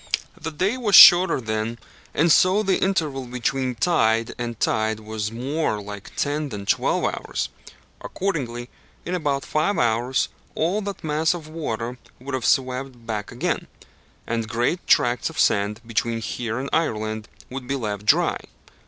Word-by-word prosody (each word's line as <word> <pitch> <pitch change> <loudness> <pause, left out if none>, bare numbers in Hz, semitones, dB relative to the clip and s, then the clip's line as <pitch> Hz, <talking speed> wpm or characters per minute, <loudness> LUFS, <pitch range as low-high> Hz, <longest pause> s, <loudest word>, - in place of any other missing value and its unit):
The 160 - -5
day 190 +10 -1
was 215 -6 +2
shorter 180 -3 +9
then, 110 0 -3 0.4
and 165 +3 +3
so 185 +6 +5
the 195 -2 +1
interval 155 -9 0
between 125 +1 -2
tide 115 -5 +2
and 120 -2 -4
tide 110 0 0
was 110 -1 -4
more 130 0 -2
like 100 -1 -9
ten 145 +1 -1
than 100 -4 -6
twelve - - +1
hours. - - -2 0.5
Accordingly, 130 -11 -3 0.4
in 175 - -3
about 145 -6 -1
five 155 +7 0
hours, 120 +2 +1 0.3
all 180 +7 0
that 200 -1 -6
mass 155 +2 +1
of 160 -3 -8
water 125 -6 -4 0.2
would 135 +2 -7
have 130 -3 -2
swept 130 -2 0
back 105 -3 -4
again, - - -2 0.6
and 115 -1 -2
great 120 +11 -1
tracts 120 0 +3
of - - -8
sand 105 +2 +2
between 115 0 -1
here 115 +1 -3
and 135 +2 -3
Ireland 110 -8 -1 0.2
would 130 -1 -6
be 135 - -1
left 105 -5 -3
dry. - - +3
125 Hz, 155 wpm, -23 LUFS, 110-155 Hz, 0.6 s, shorter